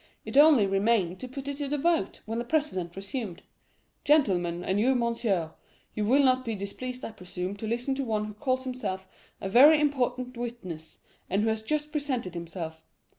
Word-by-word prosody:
It - - -6
only 290 -6 +7
remained 195 -2 +1
to 255 - -6
put 270 +2 -7
it 280 -1 -3
to 285 -1 -3
the 295 +2 -1
vote, 330 - 0
when 225 +2 -3
the - - -1
president 240 - -1
resumed: 195 -2 -5 0.6
'Gentlemen 180 - +2
and 190 +2 0
you, 260 +5 +3
monsieur,—you 215 -4 -2
will 275 +5 +5
not 255 -1 +3
be 230 -3 -3
displeased, 250 +6 -6
I - - -5
presume, 180 -1 -5
to 220 - -5
listen 240 +4 -1
to 275 +1 -2
one 215 -3 -1
who 210 - -7
calls 255 +3 -1
himself 205 -8 -4 0.3
a - - -4
very 285 +10 +7
important 255 -3 0
witness, 185 -10 -6 0.3
and 200 +3 +1
who 225 - +2
has 220 0 -1
just 300 +6 -2
presented 265 - -2
himself. 165 -2 -6
230 Hz, 180 wpm, -28 LUFS, 190-265 Hz, 0.6 s, only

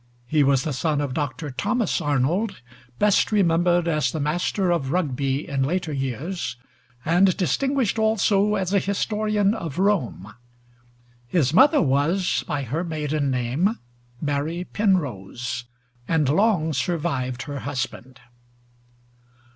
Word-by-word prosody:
He 150 +4 +2
was 135 -2 +3
the 155 - -2
son 150 +2 0
of 145 -3 -2
Dr. 145 0 -3
Thomas 205 - 0
Arnold, 150 - 0 0.4
best 210 +1 +3
remembered 175 -3 +3
as 155 -3 +1
the 160 - -4
master 175 +5 0
of 140 -6 0
Rugby 140 -5 -1
in 140 -1 -1
later 160 +3 -1
years, 135 - -3 0.5
and 180 +3 +3
distinguished 240 - 0
also 210 -1 +2
as 190 -1 -1
a 200 - +5
historian 210 +1 0
of 165 -10 -5
Rome. 160 - 0 0.9
His 145 -1 +1
mother 290 - +6
was, 155 +7 +1
by 145 -2 -2
her 145 +8 -2
maiden 155 -3 -2
name, 130 - 0 0.4
Mary 150 +4 -2
Penrose, 125 - -1 0.4
and 160 -4 +2
long 160 - +2
survived 140 -8 -2
her 145 -1 -5
husband. 130 -2 -5
160 Hz, 125 wpm, -23 LUFS, 135-190 Hz, 0.9 s, mother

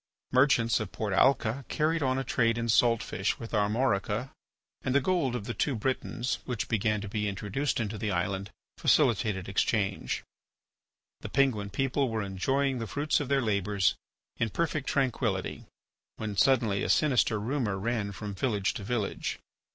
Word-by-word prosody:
Merchants 125 -3 +4
of 110 -4 -4
Port 105 -3 -3
Alca 130 +2 +3
carried 160 +2 +1
on 130 -2 +1
a 135 - -1
trade 115 -3 +1
in 115 0 -1
salt 115 0 +4
fish 95 - -1
with 115 - -8
Armorica 105 +2 0 0.5
and 130 - -1
the - - +7
gold 140 -5 0
of 120 - -3
the 120 - -3
two 140 +2 0
Britains, 125 +1 -2
which 120 -3 -3
began 105 -1 +1
to 105 - -5
be 105 +1 -2
introduced 105 +9 -2
into 105 -2 -3
the 110 - -1
island, 95 +1 -1 0.3
facilitated 105 -4 +2
exchange. 100 0 0 1.0
The - - -7
Penguin 115 -8 +1
people 135 +5 0
were 110 -2 -2
enjoying 130 +8 0
the 115 - -4
fruit 145 +9 0
of 145 - -3
their 140 -1 +2
labours 100 -3 +1 0.4
in 115 - 0
perfect 155 +2 -1
tranquillity 130 -4 -1 0.5
when 110 -2 -4
suddenly 115 -4 +3
a - - -1
sinister 125 -7 +3
rumour 115 -3 -1
ran 105 0 -1
from 100 +1 -6
village 100 -1 0
to 100 - -6
village. 110 -1 -2
115 Hz, 160 wpm, -29 LUFS, 100-130 Hz, 1.0 s, the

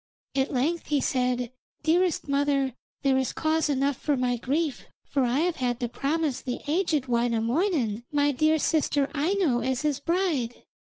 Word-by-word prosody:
At 270 0 0
length 300 +7 0
he 295 -1 +2
said: 250 -2 0 0.3
'Dearest 340 +1 +2
mother, 280 -2 +1 0.3
there 265 -1 +3
is 260 - -1
cause 315 0 +1
enough 275 -1 +1
for 290 -3 0
my 250 -1 +1
grief, 280 +5 -1 0.2
for 275 -2 0
I 250 +4 +1
have 350 0 0
had 245 -2 -1
to 240 - 0
promise 285 +2 -1
the 250 -2 -4
aged 310 -3 +1
Wainamoinen 240 - 0
my 290 -1 +3
dear 310 +4 +3
sister 290 -2 +1
Aino 320 -3 +1
as 260 +3 -1
his 295 -2 0
bride.' 320 -8 -1
280 Hz, 160 wpm, -27 LUFS, 250-315 Hz, 0.3 s, there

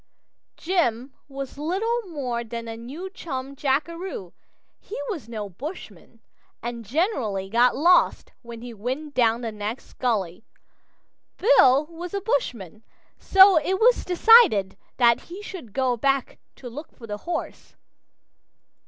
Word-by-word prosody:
Jim 270 -8 -1
was 275 0 -7
little 415 +10 -1
more 250 -7 -3
than 230 0 -7
a 225 - -5
new 265 +11 -8
chum 275 -8 -6
jackaroo; 295 - -2 0.5
he 440 - -8
was 290 - -7
no 215 -3 -5
bushman 275 - -10 0.4
and 235 -1 -5
generally 225 - -1
got 240 +3 +3
lost 350 +5 +3
when 235 -2 -10
he 245 -1 -8
went 260 +8 -5
down 235 -2 +2
the 230 -2 -3
next 215 +4 -6
gully. 210 -7 -1 0.9
Bill 300 - +5
was 340 +3 -8
a - - 0
bushman, 230 - -2 0.4
so 385 -3 +7
it 375 +5 -1
was 485 +2 +4
decided 360 - +5 0.2
that 235 -2 +4
he 380 +4 -8
should 360 - -9
go 255 +2 0
back 270 +2 -1 0.2
to 255 - -10
look 290 +6 -9
for 235 - -13
the 205 -2 -5
horse. 340 - -5
265 Hz, 135 wpm, -24 LUFS, 230-345 Hz, 0.9 s, so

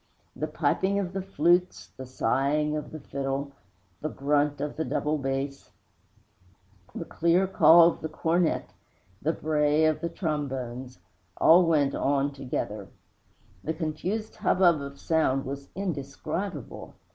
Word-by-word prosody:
The - - -3
piping 195 +1 0
of 190 -2 -2
the 195 - -2
flute, 180 0 +1
the 130 -1 -8
sighing 140 +5 0
of 150 -1 -4
the 155 - -7
fiddle, 140 0 -3 0.5
the 155 - -2
grunt 145 0 0
of 145 +1 -3
the 160 - -1
double 150 -1 -1
bass, 135 +1 -3 1.3
the 165 - -4
clear 170 +4 +2
call 170 -2 +7
of - - -6
the 160 - -4
cornet, 165 +2 0 0.5
the 155 - +1
bray 150 -1 +2
of 155 -1 +1
the 170 - -2
trombones, 130 - -4 0.4
all 170 +1 +6
went 145 -4 +2
on 140 0 0
together. 105 -7 -4 0.8
The 160 - -2
confused 180 +8 -3
hubbub 180 -7 +3
of 140 0 -8
sound 145 -5 +1
was 140 +1 -6
indescribable. 155 - -5
150 Hz, 135 wpm, -27 LUFS, 140-170 Hz, 1.3 s, call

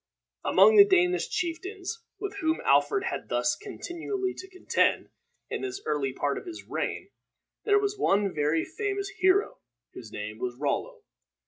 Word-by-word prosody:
Among 440 -1 +6
the 405 - +12
Danish 360 -2 +2
chieftains 380 +5 -4 0.2
with 405 0 -5
whom 320 -4 0
Alfred 405 -2 +3
had 380 - -4
thus - - +1
continually 380 -1 -4
to 380 - -10
contend 370 0 +1 0.4
in - - -2
this 390 0 -4
early 140 -3 0
part 140 +2 -1
of - - -14
his 340 -1 -7
reign, - - -4 0.5
there 410 -1 +5
was 410 0 -1
one 200 - +2
very 150 +2 +1
famous 400 -2 -3
hero, 375 +3 +2 0.3
whose 115 -3 -10
name 105 +1 -6
was 125 0 -3
Rollo. 435 - -2
375 Hz, 150 wpm, -28 LUFS, -, 0.5 s, the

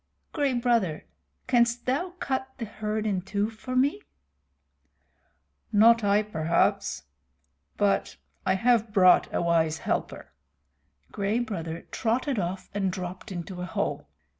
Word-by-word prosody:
Gray 285 -4 +1
Brother, 235 -10 +1 0.4
canst 240 -1 +2
thou 345 +8 -1
cut 265 0 -2
the 235 - -4
herd 215 0 -3
in 195 -4 0
two 205 +3 -2
for 255 +3 -6
me?" 255 - +2 1.7
"Not 230 +2 +6
I, 205 +1 +3
perhaps 170 -5 0 0.7
but 205 -1 +1 0.3
I 190 -1 +2
have 230 +1 +2
brought 185 -3 +5
a - - 0
wise 165 -2 +2
helper." - - -3 0.8
Gray 205 +2 -1
Brother 170 -9 -4
trotted 250 +2 0
off 185 +1 -3
and 195 -2 0
dropped 185 +3 -6
into 180 0 -6
a - - -3
hole. 165 - -3
210 Hz, 125 wpm, -27 LUFS, 185-235 Hz, 1.7 s, Not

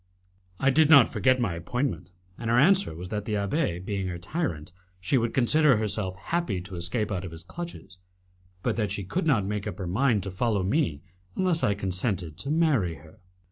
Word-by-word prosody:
I 135 - +3
did 155 +2 +4
not 140 -6 +8
forget 130 -1 +3
my 110 -8 0
appointment, 95 +2 -3 0.3
and 115 -1 -5
her 120 - +3
answer 185 - +4
was 90 +2 -7
that 105 0 -3
the 110 - -1
abbé 100 - -1
being 100 -2 -2
her 90 -1 -4
tyrant, 90 - -3 0.3
she 95 +8 0
would 115 -2 +1
consider 135 +1 +4
herself 105 -3 -2
happy 165 - -2
to 95 +1 -8
escape 95 +6 -2
out 95 -2 -2
of 95 - -5
his 80 0 -10
clutches, 100 - -9 0.6
but - - 0
that 105 -3 0
she 100 - -4
could 165 - -2
not 115 -10 +3
make 105 +1 -3
up 100 - -5
her 95 - -4
mind 105 +3 +1
to 95 - -4
follow 100 0 0
me 95 - 0 0.3
unless 180 -3 +1
I 100 - +2
consented 95 -4 -2
to 140 - -5
marry 145 - +2
her. 80 +8 -17
105 Hz, 200 wpm, -27 LUFS, 90-135 Hz, 0.6 s, not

